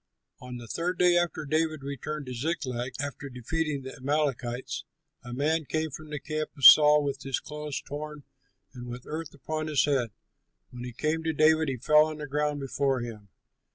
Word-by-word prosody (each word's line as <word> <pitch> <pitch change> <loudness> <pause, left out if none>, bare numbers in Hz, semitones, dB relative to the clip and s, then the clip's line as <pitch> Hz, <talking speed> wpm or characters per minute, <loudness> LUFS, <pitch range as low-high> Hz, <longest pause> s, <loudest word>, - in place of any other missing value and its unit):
On 125 -1 -8
the 120 -1 -9
third 175 +8 -2
day 180 -1 +5
after 175 -3 0
David 155 0 0
returned 140 +2 -5
to 125 - -6
Ziklag, 125 -3 -2
after 145 0 -4
defeating 140 +3 -2
the 130 - -8
Amalekites, 135 -3 -1 0.4
a 120 - -8
man 155 +6 +1
came 155 +2 -1
from 155 +3 -9
the 150 -1 -4
camp 155 0 -3
of 135 - +1
Saul 150 -1 +9
with 140 -1 -3
his 135 -1 -2
clothes 150 -1 -5
torn 150 0 -7 0.5
and 125 -1 -8
with 120 +1 -7
earth 155 -1 -6
upon 155 +2 -4
his 150 -3 +3
head. 135 -5 +1 0.6
When 125 0 -8
he 125 - -5
came 155 +6 -1
to 160 0 0
David, 155 0 +4
he 130 - -2
fell 150 +5 +5
on 155 -1 -6
the 150 - -5
ground 150 +1 -1
before 135 -1 0
him. 110 -4 -8
145 Hz, 190 wpm, -28 LUFS, 130-155 Hz, 0.6 s, Saul